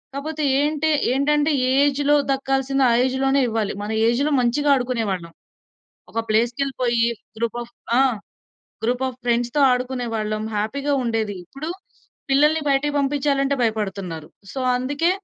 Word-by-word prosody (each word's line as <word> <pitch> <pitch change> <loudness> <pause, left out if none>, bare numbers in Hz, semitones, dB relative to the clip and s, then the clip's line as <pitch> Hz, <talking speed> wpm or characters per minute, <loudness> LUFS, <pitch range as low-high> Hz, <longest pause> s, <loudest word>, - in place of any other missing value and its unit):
కాపోతే 305 +2 -4 0.2
ఏంటి 300 +1 +1 0.2
ఏంటంటే, 295 +3 +2 0.2
ఏ - - +2
ఏజ్‌లో 290 +1 +2 0.2
దక్కాల్సింది 270 0 0
ఆ - - +3
ఏజ్‌లోనే 270 +1 +1
ఇవ్వాలి. 220 -2 -1
మన 210 - -5 0.2
ఏజ్‌లో 270 +6 +1
మంచిగా 285 +5 +1
ఆడుకునేవాళ్ళం. 225 -9 -2 0.8
ఒక 230 - -2
ప్లేస్‌కెళ్ళిపోయి 235 +1 +1 0.3
గ్రూప్ 235 +1 -2
ఆఫ్ 240 0 -17 0.3
ఆ! - - +6 0.8
గ్రూప్ 250 +3 0
ఆఫ్ 255 -1 -9
ఫ్రెండ్స్‌తో 240 +3 +1
ఆడుకునేవాళ్ళం. 235 -4 -2
హ్యాపీగా 280 +7 -1
ఉండేది. 220 -3 -1
ఇప్పుడు, 280 - -6 0.6
పిల్లల్ని 300 +3 +4
బయటకి 280 +2 +1
బంపించాలంటే 280 0 +1
భయపడుతున్నారు. 195 -8 -3 0.2
సో, - - -5 0.2
అందుకే 285 +7 0
260 Hz, 120 wpm, -22 LUFS, 230-280 Hz, 0.8 s, ఆ